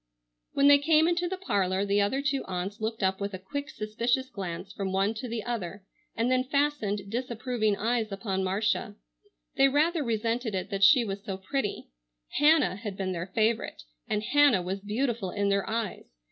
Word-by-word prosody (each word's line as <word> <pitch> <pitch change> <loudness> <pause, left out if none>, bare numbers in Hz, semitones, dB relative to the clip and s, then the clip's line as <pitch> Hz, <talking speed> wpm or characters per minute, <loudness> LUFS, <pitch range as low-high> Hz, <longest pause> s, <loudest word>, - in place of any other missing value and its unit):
When 280 0 +4
they 285 0 +8
came 315 +2 +4
into 350 +1 +1
the 375 +2 -3
parlor 195 - 0
the 200 0 +2
other 265 +8 0
two 275 -2 0
aunts 190 +4 -4
looked 220 -1 -2
up 190 +1 +1
with 200 -1 -3
a - - -4
quick, 285 +10 -5
suspicious 235 +5 -1
glance 190 0 -6
from 195 -1 -3
one 195 +3 +1
to 230 +3 -6
the 230 -2 -4
other 205 -5 -4 0.3
and 235 +3 +1
then 255 0 +3
fastened 255 -8 -1
disapproving 235 -2 -1
eyes 225 0 0
upon 195 -1 -2
Marcia. 205 +3 0 0.6
They 270 - +6
rather 305 +4 +2
resented 230 -1 -1
it 185 - -3
that 195 0 -1
she 240 +4 +7
was 200 -1 -5
so 195 -4 -4
pretty. 205 +4 -3 0.5
Hannah 295 - +4
had 205 -2 -6
been 190 -1 -2
their 175 0 -4
favorite, 215 - 0 0.2
and 210 - -1
Hannah 280 -6 +4
was 190 +2 -3
beautiful 220 0 -2
in 200 +2 0
their 200 +1 0
eyes. 220 - -3
215 Hz, 185 wpm, -28 LUFS, 195-260 Hz, 0.6 s, they